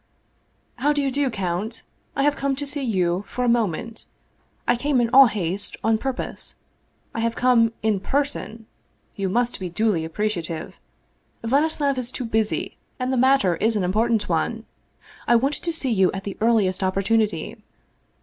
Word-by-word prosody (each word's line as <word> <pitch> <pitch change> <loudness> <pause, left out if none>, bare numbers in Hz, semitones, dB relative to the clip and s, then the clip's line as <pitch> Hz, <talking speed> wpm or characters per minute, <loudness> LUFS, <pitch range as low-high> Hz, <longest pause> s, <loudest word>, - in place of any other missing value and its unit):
" - - -43 0.3
How 290 +4 +2
do 290 - 0
you 270 - 0
do, 280 0 +1
count! 195 +2 -3 0.3
I 275 - +1
have 290 0 +3
come 275 -2 -1
to 285 +2 -4
see 285 0 -3
you 185 -6 0
for 250 - -2
a - - +1
moment. 230 -1 -1 0.6
I 245 - +4
came 275 +2 +1
in 235 -1 +1
all 270 0 +9
haste, 200 -2 -3
on 220 0 +2
purpose. 265 +1 -4 0.6
I - - -4
have 230 0 0
come 240 -3 +4
in 215 -3 +2
person, 265 -2 -2 0.5
you 195 -1 -2
must 240 +4 0
be 185 -2 -4
duly 185 -2 +1
appreciative! 165 -2 -3 0.6
Vladislav 280 +2 +1
is 250 0 -4
too 255 - -4
busy, 220 -1 -1 0.2
and 255 0 -1
the - - +2
matter 255 -9 +3
is 225 +4 +1
an 205 - +1
important 215 +4 +1
one. 220 +7 -1 0.6
I 240 - +5
wanted 270 +5 +1
to 340 - +1
see 285 -6 0
you 190 -4 +3
at 195 0 -5
the 200 -1 -5
earliest 215 -5 +2
opportunity. 200 +3 0
230 Hz, 170 wpm, -23 LUFS, 195-260 Hz, 0.6 s, all